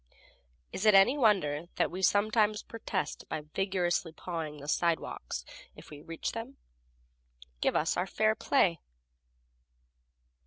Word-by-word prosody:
Is 210 - -1
it 210 - +7
any 195 +8 +6
wonder 180 - +2 0.2
we 185 +2 -6
sometimes 210 +2 +2
protest 215 -4 -4
by 155 - -3
vigorously 180 -3 0
pawing 160 -2 -5
the 145 0 -10
sidewalks, 165 - -1 0.3
if - - -14
we 145 - -9
can - - -18
reach 165 -1 -3
them? 235 +4 -7 1.0
Give - - +1
us 160 - +1
fair 215 +2 +2
play. 190 - +2
185 Hz, 120 wpm, -30 LUFS, 165-215 Hz, 1.0 s, it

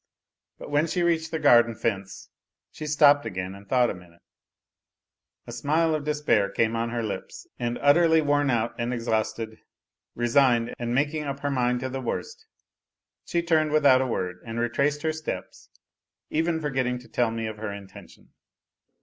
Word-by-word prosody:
But - - -10
when 145 +3 +2
she 175 +2 -1
reached 165 -2 +1
the 160 - -2
garden 120 -6 +5
fence 100 -4 -4 0.4
she 155 - -7
stopped 145 -1 +5
again 95 -4 -5
and 100 0 -14
thought 125 -2 +3
a - - -4
minute; 85 -1 -16 1.2
a - - -9
smile 160 +2 +1
of 150 -2 -2
des 150 0 -2
pair 100 -7 +3
came 110 +3 0
on 115 +1 -1
her 120 0 -2
lips, 110 - -6
and 120 0 -2
utterly 160 +3 +5
worn 145 -2 +2
out 115 -2 0
and 120 +1 -1
exhausted, 110 -1 -2 0.6
resigned, 120 -1 +2
and 120 0 -2
making 150 +3 0
up 140 0 -5
her 145 - -1
mind 125 -2 0
to 130 - -3
the 135 +1 -4
worst, 450 - -5 0.8
she 170 -1 -1
turned 160 -2 +2
with 155 -1 +2
out 130 -2 +6
a 130 - 0
word 90 -6 -3
and 115 0 -5
retraced 140 +5 0
her 160 0 0
steps, 155 -1 -7 0.6
even 165 +1 0
forgetting 130 -4 -1
to 120 - -13
tell 120 -2 0
me 115 0 -4
of 110 -1 -5
her 110 -1 -5
intention. 100 -1 -12
125 Hz, 175 wpm, -26 LUFS, 115-150 Hz, 1.2 s, out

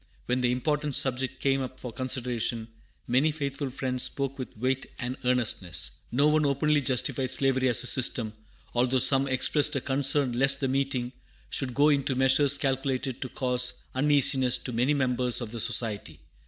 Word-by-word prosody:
When 125 +1 0
the 125 -1 +2
important 145 +2 -1
subject 130 0 0
came 135 0 +1
up 130 0 -7
for 125 -3 -7
consideration, 120 -3 -3 0.4
many 130 +6 +2
faithful 140 -2 -4
Friends 130 -1 -3
spoke 135 +1 -2
with 130 - -7
weight 130 +3 -1
and 125 +1 -4
earnestness. 115 -9 -1 0.2
No 140 +5 +3
one 155 0 +3
openly 145 +1 +1
justified 130 0 -1
slavery 130 0 +1
as 120 0 +3
a - - -5
system, 120 -3 +1 0.4
although 125 +2 +1
some 135 +2 +4
expressed 145 +3 +2
a - - +1
concern 140 0 +2
lest 135 +3 +2
the 135 - -1
meeting 130 -2 -1 0.4
should 125 -3 -2
go 145 +2 +4
into 140 -2 +1
measures 135 +2 +4
calculated 135 -1 -2
to 130 - -4
cause 125 0 0 0.2
uneasiness 130 -2 +3
to 125 0 -7
many 125 +6 +1
members 125 -2 0
of 120 -4 -6
the 115 - -6
Society. 110 - -3
130 Hz, 170 wpm, -27 LUFS, 125-140 Hz, 0.4 s, some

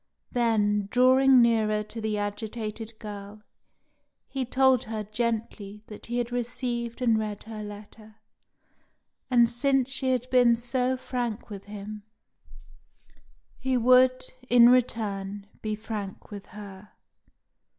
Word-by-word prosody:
Then, 210 -4 +1
drawing 255 +1 +5
nearer 215 -2 +2
to 225 +2 -8
the 215 -1 -1
agitated 215 +2 -4
girl, 210 -1 -9 0.8
he 265 -2 -3
told 260 0 +3
her 220 -1 -4
gently 215 -1 -3
that 210 - -10
he 240 +1 -2
had 240 0 -2
received 240 0 -3
and 225 -3 +3
read 210 -1 -4
her 220 -1 -8
letter, 210 +1 -11 1.1
and 240 -2 +5
since 265 +2 +1
she 265 -1 0
had 250 -1 -1
been 245 -2 +5
so 250 +2 -1
frank 240 -3 -4
with 200 -1 -8
him, 210 +1 -8 1.6
he 260 -1 0
would, 255 +1 +5 0.3
in 240 0 +7
return, 205 -5 0 0.2
be 215 -1 -2
frank 210 -3 -7
with 200 -1 -8
her. 200 0 -11
225 Hz, 120 wpm, -27 LUFS, 210-245 Hz, 1.6 s, in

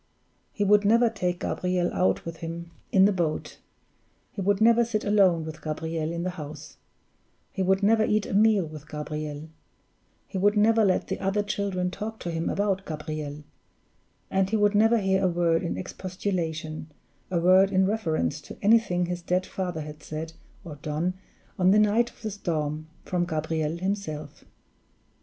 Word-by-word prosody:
He 205 - -1
would 205 +1 +5
never 230 +3 +4
take 180 -5 -2
Gabriel 180 -1 -1
out 185 - +1
with 165 -1 -6
him 170 +1 -6 0.2
in 190 -1 +6
the 205 - +4
boat; 170 -5 -2 0.7
he 200 - -5
would 200 +1 +2
never 230 +2 +5
sit 225 -2 -2
alone 190 -6 +3
with 155 -1 -8
Gabriel 160 +1 -3
in 170 0 -3
the 185 - -1
house; 150 +1 -9 0.7
he 195 - -3
would 190 +1 +2
never 220 +2 +4
eat 215 -1 +1
a - - -5
meal 210 -2 +4
with 155 -1 -10
Gabriel; 150 0 -5 0.8
he 190 - -4
would 205 +2 +3
never 220 +1 +4
let 190 -3 +2
the - - -4
other 195 +2 0
children 195 -3 -2
talk 220 +4 -5
to 175 - -3
him 165 0 -2
about 195 -1 0
Gabriel; 150 -2 -5 0.9
and 190 0 +2
he 220 - +1
would 205 0 +3
never 225 +3 +5
hear 190 -2 +1
a - - +4
word 170 -1 +2
in 170 - -3
expostulation, 175 -5 -4 0.4
a 175 -2 +1
word 185 +3 +5
in 190 0 +3
reference 165 -7 -1
to - - -11
anything 205 -5 +4
his 175 0 -4
dead 180 +2 0
father 180 -5 -4
had 150 0 -9
said 155 +2 -6 0.3
or 155 -3 -8
done 155 +5 -2 0.5
on 180 0 +5
the 200 - +5
night 215 +3 +3
of - - -21
the 215 - -2
storm, 155 -5 -3 0.2
from 180 -1 0
Gabriel 160 -1 -2
himself. 185 -5 -4
180 Hz, 170 wpm, -26 LUFS, 160-205 Hz, 0.9 s, in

